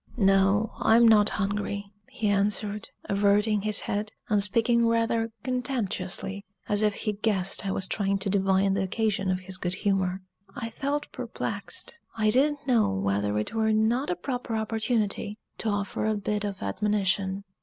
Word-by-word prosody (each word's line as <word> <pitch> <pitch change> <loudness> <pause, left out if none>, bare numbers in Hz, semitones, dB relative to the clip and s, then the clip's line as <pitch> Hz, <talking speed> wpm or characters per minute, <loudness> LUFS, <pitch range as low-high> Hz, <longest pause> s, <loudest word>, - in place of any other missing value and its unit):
"No, 195 +1 +3
I'm 230 +1 +5
not 210 -2 +6
hungry," 200 0 -2 0.2
he 220 - -2
answered, 205 +1 0 0.2
averting 205 +1 +2
his 215 0 +1
head, 210 +1 -3 0.2
and 210 -2 +3
speaking 230 +3 +4
rather 230 0 +1
contemptuously, 200 -6 -2 0.2
as 205 0 +2
if 210 -1 +2
he 215 - -2
guessed 200 -2 -1
I - - 0
was 190 0 0
trying 200 -1 0
to 195 +1 -2
divine 195 0 +2
the 195 - 0
occasion 195 0 0
of 185 0 0
his 185 0 -5
good 180 0 -2
humor. 190 -2 0 0.3
I 230 -4 -5
felt 290 +4 -3
perplexed - - -5 0.2
I 215 -1 +3
didn't 290 +4 +2
know 240 -5 +3
whether 100 +2 0
it 105 - -3
were 220 -1 +2
not 225 +5 +1
a 180 - 0
proper 245 +4 -4
opportunity 220 -1 -1 0.2
to 225 - -1
offer 205 +1 -1
a 215 - +1
bit 205 +1 -2
of 200 -2 -4
admonition. 195 - 0
205 Hz, 160 wpm, -27 LUFS, 195-225 Hz, 0.3 s, not